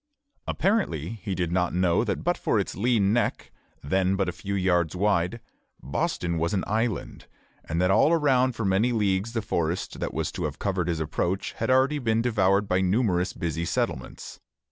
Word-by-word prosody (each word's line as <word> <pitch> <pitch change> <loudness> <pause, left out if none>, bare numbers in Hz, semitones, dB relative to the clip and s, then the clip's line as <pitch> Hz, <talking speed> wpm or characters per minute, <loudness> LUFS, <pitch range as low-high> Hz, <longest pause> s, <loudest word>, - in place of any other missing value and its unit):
Apparently 190 - 0
he 100 -4 -3
did 85 -2 -1
not 90 -1 0
know 90 -2 +2
that - - -2
but - - +1
for - - 0
its - - -2
lean 105 -1 +2
neck 120 - -1 0.3
then 95 +6 +1
but 95 -1 0
a - - 0
few 100 +3 -5
yards 90 -3 +1
wide 100 +2 +1 0.4
Boston 85 +4 -2
was 85 +5 0
an 95 - 0
island, 110 -1 -2 0.4
and 85 - -2
that 90 +1 +3
all 150 - +4
around 130 -6 +3
for 115 -1 -3
many 100 +6 +2
leagues 105 0 0
the 115 -2 -2
forest 85 -5 -2
that - - -2
was - - -2
to - - -4
have - - -4
covered 95 -4 -1
his 85 -2 -1
approach 85 +4 -2
had 115 - -3
already 135 +3 +3
been 115 -3 +1
devoured 100 -4 +2
by 90 0 +1
numerous 95 -2 +1
busy 85 0 -3
settlements. 85 - -3
95 Hz, 185 wpm, -26 LUFS, 90-115 Hz, 0.4 s, all